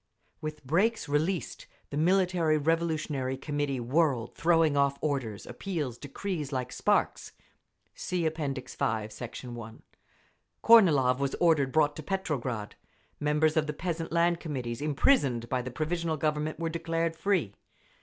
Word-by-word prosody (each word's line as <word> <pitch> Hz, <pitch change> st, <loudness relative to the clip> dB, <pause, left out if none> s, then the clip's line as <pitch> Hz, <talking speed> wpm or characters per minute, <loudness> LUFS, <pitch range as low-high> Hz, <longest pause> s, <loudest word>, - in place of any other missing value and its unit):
With 155 Hz, -2 st, -6 dB
brakes 200 Hz, -, +1 dB
released 155 Hz, +5 st, -1 dB, 0.2 s
the -, -, -4 dB
Military 175 Hz, -1 st, +2 dB
Revolutionary 155 Hz, -4 st, -1 dB
Committee 145 Hz, -1 st, -2 dB
whirled, 125 Hz, -1 st, +1 dB
throwing 165 Hz, -1 st, +3 dB
off 140 Hz, 0 st, +2 dB
orders, 130 Hz, -9 st, -2 dB
appeals, 150 Hz, -, -4 dB
decrees, 150 Hz, +1 st, -4 dB
like 125 Hz, -2 st, -3 dB
sparks. -, -, 0 dB, 0.6 s
(See 180 Hz, -2 st, -2 dB
App. 160 Hz, 0 st, -1 dB
V, 135 Hz, -4 st, -3 dB, 0.4 s
Sect. 115 Hz, +4 st, -8 dB
1)… 120 Hz, -3 st, -8 dB, 0.8 s
Kornilov 150 Hz, -, +6 dB
was 140 Hz, -1 st, -1 dB
ordered 155 Hz, -6 st, +3 dB
brought 145 Hz, -1 st, +3 dB
to -, -, -5 dB
Petrograd. 140 Hz, -, -3 dB, 0.5 s
Members 150 Hz, +1 st, +2 dB
of 155 Hz, -1 st, +2 dB
the 150 Hz, -, -2 dB
Peasant 165 Hz, 0 st, -4 dB
Land 170 Hz, 0 st, +2 dB
Committees 125 Hz, -7 st, -4 dB
imprisoned 140 Hz, -, +2 dB
by 130 Hz, -1 st, 0 dB
the 125 Hz, -, -5 dB
Provisional 160 Hz, +4 st, -2 dB
Government 150 Hz, +1 st, -1 dB
were 165 Hz, -1 st, -1 dB
declared 165 Hz, 0 st, -1 dB
free. 170 Hz, -, 0 dB
150 Hz, 135 wpm, -29 LUFS, 135-165 Hz, 0.8 s, Kornilov